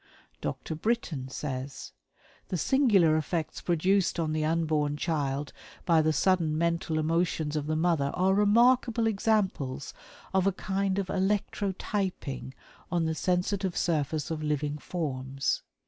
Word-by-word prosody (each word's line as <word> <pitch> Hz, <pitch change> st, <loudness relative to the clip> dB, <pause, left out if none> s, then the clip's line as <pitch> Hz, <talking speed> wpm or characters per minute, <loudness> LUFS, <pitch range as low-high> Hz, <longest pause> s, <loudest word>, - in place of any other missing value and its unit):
'" -, -, -36 dB
Dr. -, -, -4 dB
Brittain 160 Hz, -, -2 dB
says: 135 Hz, -1 st, -5 dB, 0.6 s
"The 180 Hz, -, -2 dB
singular 200 Hz, -, +4 dB
effects 155 Hz, +1 st, -2 dB
produced 180 Hz, +2 st, +1 dB
on 155 Hz, -2 st, 0 dB
the 155 Hz, 0 st, 0 dB
unborn 155 Hz, -2 st, +1 dB
child 145 Hz, -3 st, -2 dB, 0.3 s
by 165 Hz, -2 st, +5 dB
the 155 Hz, 0 st, +2 dB
sudden 165 Hz, -2 st, +2 dB
mental 170 Hz, -1 st, 0 dB
emotions 160 Hz, -1 st, 0 dB
of 150 Hz, -1 st, -2 dB
the 155 Hz, -, 0 dB
mother 160 Hz, -4 st, +2 dB
are 190 Hz, +1 st, +3 dB
remarkable 230 Hz, +3 st, +4 dB
examples 195 Hz, -11 st, 0 dB, 0.4 s
of 190 Hz, 0 st, +3 dB
a -, -, +4 dB
kind 195 Hz, 0 st, -1 dB
of 200 Hz, -, 0 dB
electrotyping 190 Hz, -7 st, -2 dB, 0.4 s
on 170 Hz, -2 st, +1 dB
the 160 Hz, -, 0 dB
sensitive 185 Hz, +3 st, 0 dB
surface 155 Hz, -1 st, 0 dB
of 155 Hz, -1 st, -3 dB
living 150 Hz, 0 st, -1 dB
forms. 135 Hz, -6 st, -2 dB
165 Hz, 130 wpm, -28 LUFS, 150-190 Hz, 0.6 s, by